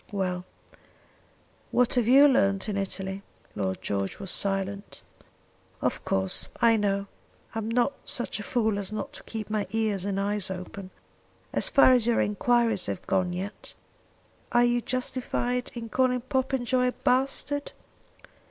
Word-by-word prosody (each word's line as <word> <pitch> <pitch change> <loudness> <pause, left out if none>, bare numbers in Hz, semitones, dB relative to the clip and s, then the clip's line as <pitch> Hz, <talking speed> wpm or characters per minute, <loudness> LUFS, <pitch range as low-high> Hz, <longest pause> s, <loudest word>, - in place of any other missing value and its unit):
Well; 185 -3 -2 1.2
what 250 -1 +2
have 245 -3 +2
you 275 +4 +8
learned 195 -8 +2
in 210 - -2
Italy?" 195 0 -3 0.3
Lord 95 -2 -2
George 100 -1 -2
was 195 -2 -5
silent. 195 0 -2 0.8
"Of - - -1
course, 95 0 +1
I 230 -1 +5
know. 200 -2 0 0.5
I'm 225 -1 -3
not 245 +4 +2
such 240 -3 -2
a - - -5
fool 220 -2 0
as 200 0 -3
not 215 - -4
to - - -9
keep 215 -2 -6
my 215 -1 -1
ears 215 -3 0
and 195 0 -1
eyes 200 -1 -1
open. 185 +1 -7 0.6
As - - +1
far 275 -2 +6
as 245 -3 +3
your 235 - +3
enquiries 225 -1 +2
have - - -4
gone 185 -1 +1
yet, 190 +4 -6 0.8
are 240 0 +5
you 240 0 +2
justified 250 0 -2
in 230 -1 -5
calling 250 +1 +1
Popenjoy 255 -1 0
a 250 - 0
bastard?" 275 +3 0
215 Hz, 145 wpm, -27 LUFS, 195-245 Hz, 1.2 s, you